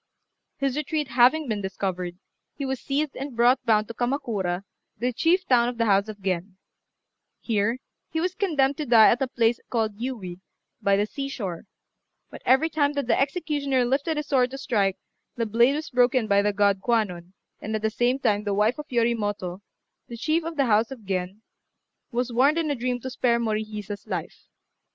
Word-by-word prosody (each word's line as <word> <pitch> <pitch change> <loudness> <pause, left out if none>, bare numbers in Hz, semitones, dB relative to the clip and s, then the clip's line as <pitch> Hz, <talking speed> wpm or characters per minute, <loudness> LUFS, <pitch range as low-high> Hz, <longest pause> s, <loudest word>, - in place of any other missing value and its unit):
His 275 -2 -1
retreat 300 -1 -2
having 255 +6 +4
been 215 -3 -2
discovered, 185 -2 -3 0.4
he 280 - -4
was 265 -1 -2
seized 285 +1 -2
and 275 -2 -6
brought 245 +3 +4
bound 215 -1 +3
to 230 - -7
Kamakura, 220 -8 -2 0.3
the 245 +3 -1
chief 355 +8 +2
town 240 -2 +3
of 245 - -7
the 230 - +1
house 200 -1 +3
of 210 -1 -8
Gen. 185 0 -3 0.8
Here 225 +1 0 0.3
he 320 - -2
was 360 +2 -1
condemned 290 -9 +1
to 300 - -4
die 230 -2 +7
at 245 - 0
a 270 - +1
place 235 -1 +1
called 220 -3 -1
Yui, 205 -9 -5 0.4
by 200 0 +3
the 205 - +2
sea 275 +5 -5
shore; 190 -11 -5 0.7
but - - -10
every 265 +5 +5
time 295 -2 +1
that 285 -2 -2
the 240 - +2
executioner 280 -3 0
lifted 280 +5 0
his 300 - -2
sword 255 -4 +2
to 270 - -7
strike, 205 -8 0 0.4
the 230 - -1
blade 235 +5 +3
was 310 0 -5
broken 245 -1 +3
by 200 -1 +3
the 205 +1 +1
god 200 -1 +2
Kwannon, 190 -7 -1 0.3
and 220 +1 -3
at 215 - -3
the 220 - +1
same 245 +3 +1
time 210 -6 +1
the 205 -1 -1
wife 215 +7 +2
of 300 - -7
Yoritomo, 205 -6 -1 0.5
the 235 - -8
chief 310 +6 0
of 330 0 -5
the 275 - +3
house 220 -1 +3
of 245 -6 -10
Gen, 190 +2 -3 0.7
was 245 0 -2
warned 275 +6 +4
in 320 -3 0
a - - 0
dream 250 0 -2
to 260 - -5
spare 235 -1 +1
Morihisa's 215 -2 -4
life. - - -5
235 Hz, 190 wpm, -25 LUFS, 205-275 Hz, 0.8 s, die